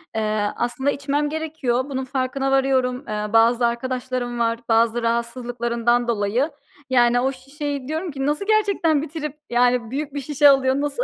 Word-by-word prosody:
Eee, 215 -1 0
aslında 265 +4 -1
içmem 285 +1 -1
gerekiyor. 295 -5 -2
Bunun 265 -1 -3
farkına 270 +1 -1
varıyorum. 265 -1 +1
Eee, 210 0 -3
bazı 235 +2 +4
arkadaşlarım 245 0 -2
var, 230 0 +1
bazı 230 +1 +3
rahatsızlıklarından 235 0 0
dolayı. 235 +7 0 0.4
Yani, 245 -1 +4
o 265 +2 +1
şişeyi 275 +1 -6
diyorum 320 +2 -3
ki 270 0 -3
nasıl 300 +7 -1
gerçekten 400 -8 +2
bitirip, 300 -1 -5
yani, 245 -1 +2
büyük 285 +1 -4
bir 285 - -3
şişe 290 +1 +4
alıyor, 265 -1 +3
nasıl 290 - -1
260 Hz, 150 wpm, -22 LUFS, 240-285 Hz, 0.4 s, bazı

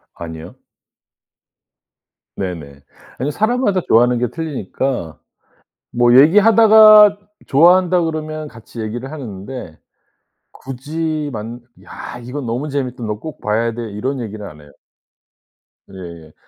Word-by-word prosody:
아니요. 80 -1 -9 1.8
네네. 80 -7 -6 0.4
아니 135 +4 -2
사람마다 215 - 0
좋아하는 120 +2 +4
게 125 - 0
틀리니까. 135 - -4 0.7
뭐 120 +1 +4
얘기하다가 210 +4 +7 0.3
좋아한다 180 +4 +4
그러면 155 -1 -4
같이 115 0 -11
얘기를 120 +4 -5
하는데 115 - -8 0.7
굳이 150 +3 -5
만 115 +3 -7 0.2
"야 120 - -9
이거 130 +5 -6
너무 125 +4 -4
재밌다. 130 -4 -4
너 105 -1 -4
꼭 155 +6 -9
봐야 115 +2 0
돼." 115 -2 -6
이런 130 +7 -3
얘기는 110 -2 -7
안 75 -3 -13
해요. 75 -1 -17 1.2
예예. 85 -4 -11
125 Hz, 245 characters per minute, -18 LUFS, 105-155 Hz, 1.8 s, 얘기하다가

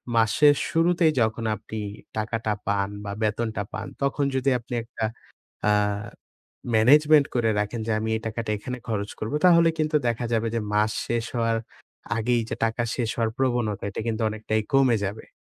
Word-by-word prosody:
মাসের 115 +6 +5
শুরুতেই 165 0 +3
যখন 110 +1 0
আপনি 110 0 -7 0.4
টাকাটা 110 0 -1
পান 100 -1 +1 0.2
বা, 100 - -4
বেতনটা 110 0 -1
পান, 110 0 -4 0.2
তখন 140 +1 +1
যদি 130 +1 +2
আপনি 120 +1 -9
একটা 115 -1 -4 0.6
অ্যাঁ 105 -1 +2 0.7
management 145 +6 +6
করে 115 -2 +2
রাখেন 105 +3 -3
যে, 115 - 0
আমি 110 +1 -2
এই - - -4
টাকাটা 110 0 -3
এখানে 125 +4 -5
খরচ 105 -2 -2
করবো। 110 +7 -3
তাহলে 170 -2 +6
কিন্তু 155 0 +1
দেখা 120 +1 -1
যাবে 115 0 +1
যে, 115 - 0
মাস 105 +1 +3 0.2
শেষ 120 -1 -1
হওয়ার 115 -1 +1 0.6
আগেই 120 +1 +1
যে - - -1
টাকা 115 +1 0
শেষ 120 -3 -1
হওয়ার 115 -1 +1
প্রবণতা, 120 -5 0
এটা - - -5
কিন্তু 115 0 -1
অনেকটাই 110 0 -1
কমে 130 -4 +5
যাবে। 105 +3 -6
115 Hz, 165 wpm, -25 LUFS, 110-125 Hz, 0.7 s, management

